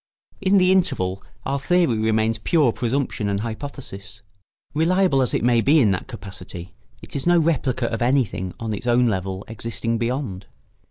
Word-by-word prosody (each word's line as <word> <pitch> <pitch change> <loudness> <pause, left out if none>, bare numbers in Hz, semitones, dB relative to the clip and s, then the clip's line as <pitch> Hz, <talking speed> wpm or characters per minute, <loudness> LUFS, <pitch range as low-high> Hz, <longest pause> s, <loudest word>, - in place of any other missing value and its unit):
In 195 +1 +4
the 185 -1 +5
interval 95 - +1 0.2
our 140 +1 -1
theory 170 -3 +2
remains 110 0 +1
pure 145 +2 +3
presumption 125 -3 -1
and 100 0 -1
hypothesis. 110 -4 -7 0.5
Reliable 165 -2 +3
as 125 - 0
it - - 0
may 120 -1 +4
be 150 +6 +4
in 110 -8 +4
that 90 - -2
capacity, 95 -4 -9 0.3
it - - -12
is 140 +3 -2
no 175 0 +5
replica 140 -6 +1
of 115 0 -2
anything 120 -8 0
on 115 -2 -3
its 105 - -5
own 120 +1 +4
level 95 -3 -2
existing 115 +1 -3
beyond. 115 -6 -3
120 Hz, 165 wpm, -22 LUFS, 100-140 Hz, 0.5 s, the